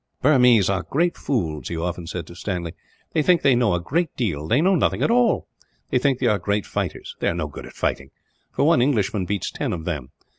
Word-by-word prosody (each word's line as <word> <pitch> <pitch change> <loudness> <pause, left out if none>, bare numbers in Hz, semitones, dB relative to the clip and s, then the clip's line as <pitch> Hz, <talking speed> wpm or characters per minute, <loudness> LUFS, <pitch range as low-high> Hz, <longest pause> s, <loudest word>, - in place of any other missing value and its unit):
"Burmese 125 -8 +5
are 95 -1 0
great 170 +4 0
fools," 80 - -2
he 85 - -4
often 85 0 -3
said 85 -1 -5
to 85 - -12
Stanley. 90 -2 -4 0.4
"They 155 - +2
think 175 +2 +3
they 140 -2 +5
know 120 -6 +2
a - - 0
great 160 - -1
deal; 80 - -2
they 120 - +3
know 185 +5 +3
nothing 180 - +1
at - - +2
all. 240 -2 +2 0.4
They - - +3
think 135 0 +2
they 130 - -2
are 105 -3 +3
great 100 0 -1
fighters; - - -4
they - - 0
are - - -2
no - - -2
good - - -9
at - - -13
fighting, 65 0 -2 0.4
for 140 - +1
one 165 -3 +4
Englishman 105 -7 +1
beats 100 0 -2
ten - - -3
of 80 -2 -5
them. 75 -8 -4
105 Hz, 230 wpm, -23 LUFS, 90-140 Hz, 0.4 s, Burmese